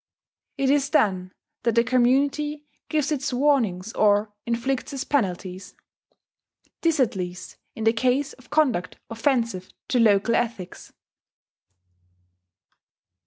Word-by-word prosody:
It 275 Hz, -1 st, +2 dB
is 285 Hz, -1 st, +2 dB
then 185 Hz, -10 st, +1 dB, 0.3 s
that 235 Hz, -1 st, 0 dB
the 235 Hz, -, +5 dB
community 280 Hz, +5 st, +1 dB, 0.2 s
gives 305 Hz, -1 st, 0 dB
its 280 Hz, -3 st, -1 dB
warnings 240 Hz, -8 st, +1 dB
or 210 Hz, 0 st, +2 dB
inflicts 250 Hz, +5 st, -2 dB
its 270 Hz, -, -3 dB
penalties: 190 Hz, -7 st, -2 dB, 1.1 s
this 330 Hz, -3 st, +1 dB
at 250 Hz, -5 st, +2 dB
least 180 Hz, -1 st, -6 dB, 0.2 s
in 220 Hz, -, -5 dB
the 225 Hz, 0 st, +4 dB
case 260 Hz, +5 st, 0 dB
of 255 Hz, -, -19 dB
conduct 265 Hz, -, +1 dB
offensive 230 Hz, -6 st, -1 dB, 0.2 s
to 250 Hz, -, +2 dB
local 215 Hz, 0 st, +4 dB
ethics. 230 Hz, -7 st, -3 dB
240 Hz, 115 wpm, -24 LUFS, 205-275 Hz, 1.1 s, the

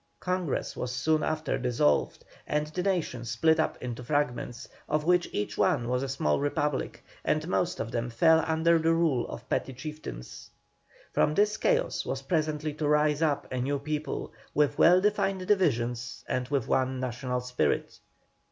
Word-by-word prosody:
Congress 180 Hz, -4 st, -2 dB
was 125 Hz, -, -3 dB
soon 155 Hz, +5 st, +1 dB
after 155 Hz, -1 st, -1 dB
dissolved, 120 Hz, -, +1 dB, 0.2 s
and 150 Hz, 0 st, 0 dB
the 155 Hz, +4 st, -4 dB
nation 175 Hz, -10 st, -1 dB
split 120 Hz, +8 st, +2 dB
up 160 Hz, -, 0 dB
into 125 Hz, -1 st, -5 dB
fragments, 120 Hz, -4 st, -2 dB, 0.2 s
of 150 Hz, 0 st, +1 dB
which 180 Hz, +1 st, +2 dB
each 105 Hz, -, -3 dB
one 120 Hz, -, +2 dB
was 125 Hz, +1 st, 0 dB
a 135 Hz, -, -3 dB
small 100 Hz, -, +1 dB
republic, 145 Hz, 0 st, -2 dB, 0.2 s
and 155 Hz, +1 st, 0 dB
most 175 Hz, -1 st, 0 dB
of 115 Hz, -, -3 dB
them 120 Hz, 0 st, -2 dB
fell 160 Hz, +7 st, +4 dB
under 165 Hz, +1 st, +3 dB
the 165 Hz, +1 st, +2 dB
rule 165 Hz, -7 st, +2 dB
of 120 Hz, -, -8 dB
petty -, -, -1 dB
chieftains. 135 Hz, -, -8 dB, 0.6 s
From 150 Hz, -, +2 dB
this 210 Hz, +1 st, +3 dB
chaos -, -, +1 dB
was -, -, -4 dB
presently 155 Hz, -3 st, -1 dB
to 150 Hz, 0 st, -2 dB
rise 150 Hz, 0 st, +3 dB
up 150 Hz, -3 st, +1 dB
a 130 Hz, -, -1 dB
new 140 Hz, +3 st, 0 dB
people, 150 Hz, +2 st, -4 dB, 0.2 s
with 150 Hz, -1 st, +2 dB
well 180 Hz, +2 st, +7 dB
defined 195 Hz, -2 st, +1 dB
divisions 120 Hz, -, 0 dB
and 125 Hz, -1 st, -1 dB
with 135 Hz, -3 st, -1 dB
one 130 Hz, 0 st, +1 dB
national 125 Hz, 0 st, -2 dB
spirit. 125 Hz, -, -1 dB
150 Hz, 165 wpm, -28 LUFS, 125-160 Hz, 0.6 s, well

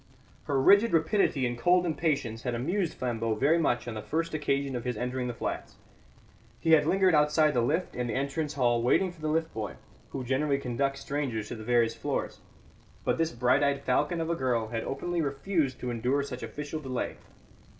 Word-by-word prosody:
Her 140 Hz, -1 st, +1 dB
rigid 200 Hz, +10 st, +5 dB
rapidity 160 Hz, -5 st, +2 dB
and 120 Hz, 0 st, -1 dB
cold 180 Hz, +5 st, +4 dB
impatience 150 Hz, -9 st, -1 dB
had 125 Hz, -1 st, -2 dB
amused 170 Hz, -, -1 dB
Flambeau 115 Hz, -3 st, -1 dB
very 145 Hz, +9 st, +3 dB
much 120 Hz, -7 st, 0 dB
on 120 Hz, -, -3 dB
the 110 Hz, -, -5 dB
first 165 Hz, +7 st, -2 dB
occasion 140 Hz, -3 st, -1 dB
of 120 Hz, -, -3 dB
his 125 Hz, -3 st, -2 dB
entering 125 Hz, +2 st, -2 dB
the 120 Hz, -, -3 dB
flats. -, -, -4 dB, 0.8 s
He 165 Hz, -, +1 dB
had 150 Hz, -2 st, +6 dB
lingered 190 Hz, 0 st, +4 dB
outside 150 Hz, 0 st, +4 dB
the 120 Hz, -, +2 dB
lift 160 Hz, +10 st, 0 dB
in 125 Hz, 0 st, -2 dB
the 115 Hz, -, -2 dB
entrance 140 Hz, +3 st, -2 dB
hall 120 Hz, -3 st, +2 dB
waiting 180 Hz, +10 st, +2 dB
for 170 Hz, -3 st, -17 dB
the 155 Hz, -, -2 dB
lift 160 Hz, +1 st, 0 dB
boy, 110 Hz, -2 st, -4 dB, 0.3 s
who 130 Hz, -, -5 dB
generally 140 Hz, +3 st, +1 dB
conducts 135 Hz, +1 st, -2 dB
strangers 130 Hz, -7 st, -3 dB
to -, -, -4 dB
the 110 Hz, -, -8 dB
various 120 Hz, -1 st, +2 dB
floors. -, -, -3 dB, 0.7 s
But -, -, +1 dB
this 165 Hz, 0 st, +1 dB
bright 125 Hz, +2 st, +2 dB
eyed 140 Hz, -1 st, +1 dB
falcon 150 Hz, +6 st, +1 dB
of 165 Hz, +1 st, -1 dB
a -, -, +1 dB
girl 120 Hz, -6 st, 0 dB
had 115 Hz, -1 st, -3 dB
openly 175 Hz, +5 st, -2 dB
refused 140 Hz, -1 st, -1 dB
to 125 Hz, -, -2 dB
endure 125 Hz, +4 st, 0 dB
such 130 Hz, -3 st, -6 dB
official 145 Hz, +7 st, -5 dB
delay. 130 Hz, -4 st, -4 dB
140 Hz, 200 wpm, -29 LUFS, 120-160 Hz, 0.8 s, had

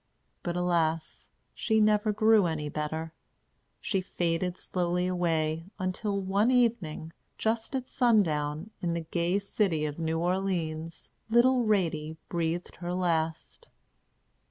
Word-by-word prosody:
But, 175 Hz, -1 st, -3 dB
alas! 165 Hz, -3 st, 0 dB, 0.2 s
she 220 Hz, -1 st, +1 dB
never 215 Hz, 0 st, +3 dB
grew 215 Hz, -2 st, +4 dB
any 150 Hz, -2 st, -2 dB
better. 160 Hz, +2 st, -3 dB, 0.7 s
She 195 Hz, -3 st, -1 dB
faded 175 Hz, 0 st, -1 dB
slowly 180 Hz, 0 st, -1 dB
away, 165 Hz, -3 st, 0 dB
until 200 Hz, +2 st, -2 dB
one 195 Hz, +4 st, +2 dB
evening, 220 Hz, -11 st, +1 dB, 0.2 s
just 225 Hz, +3 st, -1 dB
at 260 Hz, -1 st, -2 dB
sundown, 170 Hz, -, +1 dB
in 170 Hz, -2 st, 0 dB
the 170 Hz, -, -1 dB
gay 170 Hz, +3 st, 0 dB
city 195 Hz, -6 st, 0 dB
of 150 Hz, +1 st, -4 dB
New 160 Hz, 0 st, 0 dB
Orleans, 170 Hz, -3 st, -2 dB, 0.2 s
little 245 Hz, +1 st, +4 dB
Ratie 160 Hz, -7 st, 0 dB
breathed 170 Hz, 0 st, -2 dB
her 175 Hz, 0 st, -3 dB
last. 165 Hz, -3 st, -1 dB
175 Hz, 120 wpm, -29 LUFS, 160-205 Hz, 0.7 s, grew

